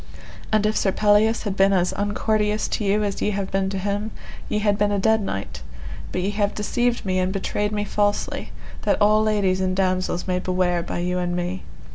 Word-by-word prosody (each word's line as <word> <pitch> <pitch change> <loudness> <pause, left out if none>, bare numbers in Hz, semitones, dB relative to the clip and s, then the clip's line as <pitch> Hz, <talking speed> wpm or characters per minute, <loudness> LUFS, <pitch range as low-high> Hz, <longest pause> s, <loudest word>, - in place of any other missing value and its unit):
And 215 -1 +3
if 215 +1 +1
Sir 195 - +2
Pelleas 215 +3 +3
had 205 -3 -2
been 195 0 +4
as 180 -1 +2
uncourteous 210 +1 0
to - - -2
you 205 +1 +2
as 200 -1 -2
ye - - +1
have 195 -1 -3
been 195 0 0
to 195 - -3
him 205 +3 -2 0.4
ye - - 0
had 210 -1 +2
been 205 0 +1
a 205 - +1
dead 220 +2 +3
knight; 95 - -4 0.5
but 180 - -1
ye 195 +3 -1
have 205 0 0
deceived 240 +3 0
me 185 -1 +1
and 185 0 0
betrayed 205 +1 -1
me 210 -1 -1
falsely, 205 0 -1 0.3
that - - +1
all 215 +1 +4
ladies 200 -4 +1
and 185 0 0
damosels 185 -1 0
may 180 -1 0
beware 180 -1 0
by - - -5
you 180 +1 -1
and 175 -1 -1
me. 180 +1 -3
200 Hz, 210 wpm, -23 LUFS, 185-210 Hz, 0.5 s, been